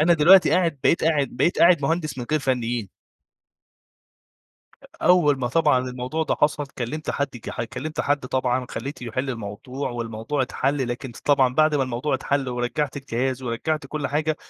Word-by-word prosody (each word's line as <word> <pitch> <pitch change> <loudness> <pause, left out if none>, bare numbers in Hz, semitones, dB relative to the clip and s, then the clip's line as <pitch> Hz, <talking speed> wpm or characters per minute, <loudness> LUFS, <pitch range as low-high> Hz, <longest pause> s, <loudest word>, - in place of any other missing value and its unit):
أنا 170 +3 +5
دلوقتي 175 +5 +6
قاعد 165 -6 +2
بقيت 170 - +3
قاعد 150 -5 +2
بقيت 170 - 0
قاعد 170 -3 +5
مهندس 155 -2 -1
من 120 - -5
غير 155 - +2
فنّيين. 120 -6 -1 2.1
أول 160 -5 +4
ما 125 -2 -1
طبعًا 150 -2 +3
الموضوع 125 +5 -3
ده - - 0
حصل، 150 0 +1
كلّمت 140 +6 -3
حد 140 0 -1
ج 120 - -7
ح - - -4
كلّمت 130 +6 -5
حد 145 0 +1
طبعًا 130 -1 0
خلّيته 135 +2 -6
يحِل 130 +3 -3
الموضوع، 125 +4 -5
والموضوع 115 +3 -3
اتحَل 135 +1 -1
لكن 120 +1 -5
ط - - -12
طبعًا 135 -3 +3
بعد 155 +1 +3
ما 140 - +2
الموضوع 130 +3 -2
اتحَل 135 0 -1
ورجّعت 125 +4 -2
الجهاز، 130 -1 -2
ورجّعت 135 +6 -2
كل 145 0 -3
حاجة، 150 +2 -1
135 Hz, 170 wpm, -23 LUFS, 125-150 Hz, 2.1 s, دلوقتي